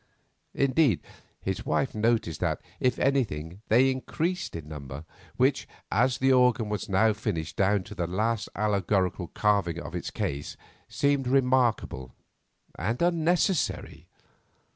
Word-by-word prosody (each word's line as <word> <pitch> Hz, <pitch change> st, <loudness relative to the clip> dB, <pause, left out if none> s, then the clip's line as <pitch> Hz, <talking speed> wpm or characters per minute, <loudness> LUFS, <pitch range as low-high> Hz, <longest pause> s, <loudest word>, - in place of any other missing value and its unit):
Indeed, 135 Hz, -, +3 dB, 0.4 s
his 95 Hz, -1 st, -2 dB
wife 135 Hz, -, 0 dB
noticed 110 Hz, -7 st, 0 dB
that, -, -, 0 dB, 0.2 s
if 125 Hz, -1 st, +1 dB
anything, 100 Hz, -, -1 dB
they 130 Hz, +4 st, +5 dB
increased 165 Hz, -, -3 dB
in 80 Hz, -3 st, -7 dB
number, 70 Hz, -1 st, -8 dB, 0.3 s
which, -, -, +2 dB, 0.2 s
as 125 Hz, +5 st, +2 dB
the 135 Hz, 0 st, +3 dB
organ 125 Hz, -3 st, +3 dB
was 105 Hz, +1 st, -3 dB
now 110 Hz, +3 st, +4 dB
finished 90 Hz, -8 st, -3 dB
down 100 Hz, 0 st, +2 dB
to -, -, -10 dB
the 85 Hz, -, -2 dB
last 110 Hz, +5 st, -1 dB
allegorical 100 Hz, -3 st, 0 dB
carvings 100 Hz, -6 st, +1 dB
of -, -, -8 dB
its -, -, -4 dB
case, 70 Hz, +1 st, -4 dB, 0.3 s
seemed 140 Hz, -2 st, +1 dB
remarkable 125 Hz, -, +1 dB, 0.6 s
and 115 Hz, +3 st, -1 dB
unnecessary. 175 Hz, +1 st, 0 dB
110 Hz, 125 wpm, -27 LUFS, 90-130 Hz, 0.6 s, they